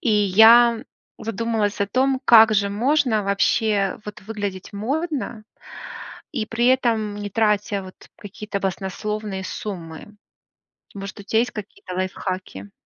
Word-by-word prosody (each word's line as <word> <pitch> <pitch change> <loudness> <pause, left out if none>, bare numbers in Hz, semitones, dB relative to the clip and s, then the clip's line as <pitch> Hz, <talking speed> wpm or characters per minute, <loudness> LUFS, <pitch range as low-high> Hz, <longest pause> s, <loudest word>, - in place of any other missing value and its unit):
И 235 - 0
я 220 +4 +6 0.3
задумалась 225 -1 -2
о 200 - +2
том, 260 +4 +1
как 225 -3 +7
же 200 -1 +2
можно, 245 0 +1
вообще 200 0 +1
вот, 210 -2 -9
выглядеть 205 -3 -5
модно, 260 +1 -3 0.9
и 220 -3 -1
при 230 +2 0
этом 220 -5 -1
не 205 - -4
тратя, 210 -1 +1
вот, 185 0 -11 0.2
какие-то 205 0 -6
баснословные 195 +1 -4
суммы. 170 -6 -6 0.9
Может, 200 +1 -7
у - - -11
тя 220 +3 +1
есть 245 +2 +1
какие-то 200 -3 -8
лайфхаки? 185 - -5
210 Hz, 125 wpm, -22 LUFS, 195-225 Hz, 0.9 s, как